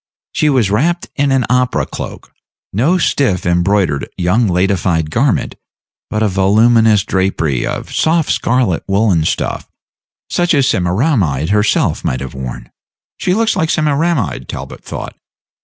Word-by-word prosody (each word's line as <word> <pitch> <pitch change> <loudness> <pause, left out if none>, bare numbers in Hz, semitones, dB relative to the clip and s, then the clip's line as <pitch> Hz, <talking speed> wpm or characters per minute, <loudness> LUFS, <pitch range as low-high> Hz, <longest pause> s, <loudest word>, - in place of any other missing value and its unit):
She 150 - +1
was 125 -8 +2
wrapped 170 - 0
in 140 -1 +1
an 130 -3 +2
opera 125 0 +1
cloak; - - -8 0.4
no 140 - +2
stiff, 135 - 0
embroidered, 90 -4 +1
young 95 +6 +2
ladified 90 -3 0
garment, - - +1 0.6
but 110 0 -1
a - - +3
voluminous 105 +2 +3
drapery 95 - -1
of - - -5
soft 160 -1 +1
scarlet 120 -8 0
woollen 95 -5 +2
stuff, - - -2 0.6
such 175 -2 +1
as 140 -2 +3
Semiramide 90 - +1
herself 105 +1 +1
might 65 - -1
have 65 0 -7
worn. 65 -2 -7 0.5
"She 180 - 0
looks 225 0 +1
like 160 - 0
Semiramide," 155 - 0
Talbot - - -7
thought. - - -7
105 Hz, 135 wpm, -15 LUFS, 90-140 Hz, 0.6 s, a